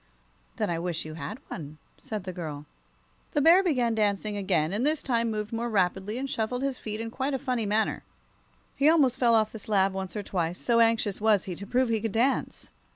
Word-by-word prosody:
"Then - - -1
I 165 - -1
wish 170 -2 -3
you 155 - -7
had 205 +7 -6
one," 155 -3 -7 0.2
said 215 -3 -5
the 185 -1 -5
girl. 150 -4 -6 0.7
The 295 - +2
Bear 335 +5 +7
began 255 -11 +1
dancing 210 -1 0
again, 185 -5 0
and 215 +4 0
this 305 +2 +2
time 235 -4 0
he - - -1
moved 210 +1 -4
more 235 +1 -2
rapidly 195 +1 0
and 270 +2 -3
shuffled 250 +1 -2
his 275 -2 -1
feet 215 0 -5
in 225 0 -4
quite 270 +3 -1
a - - +1
funny 250 -5 -2
manner. 215 +2 +1 0.7
He 285 +2 +4
almost 280 -6 +4
fell 235 -2 +4
off 215 -1 +3
the 220 - -8
slab 195 -2 +2
once 190 +1 -5
or 210 - -3
twice, 175 -2 -2
so 235 -1 +2
anxious 225 -3 +2
was 215 -3 +4
he 180 - -5
to 200 +3 -9
prove 250 +1 +2
he 225 -2 +1
could 225 -2 -2
dance. 250 +5 0
220 Hz, 220 wpm, -27 LUFS, 190-245 Hz, 0.7 s, Bear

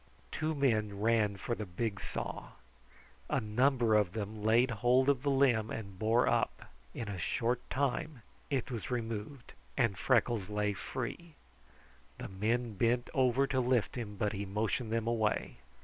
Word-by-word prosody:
Two 155 +1 -1
men 110 -7 +1
ran 105 -2 +2
for 120 - -3
the 105 -3 -4
big 100 +3 -3
saw. - - -5 0.8
A - - +2
number 120 +1 +2
of 105 -4 +3
them 105 0 -4
laid 115 +4 +4
hold 125 +4 +3
of 135 -3 +2
the 140 - 0
limb 130 -6 +3
and 100 -4 -6
bore 115 +3 +3
up. - - 0 0.2
In 115 - -4
a 100 -3 -4
short 120 +7 0
time 140 0 -1 0.3
it 135 -2 -1
was 115 -3 -4
removed, 115 +1 -4 0.2
and 115 -7 +2
Freckles 115 -5 +2
lay 105 0 0
free. 140 - -6 0.8
The - - -6
men 110 +4 -1
bent 120 +4 +1
over 130 0 +3
to 135 -1 0
lift 125 -3 +1
him, 110 -5 -5
but 105 +1 -1
he 100 0 -3
motioned 105 +3 -2
them 115 -1 0
away. 115 -2 0
115 Hz, 160 wpm, -33 LUFS, 105-125 Hz, 0.8 s, laid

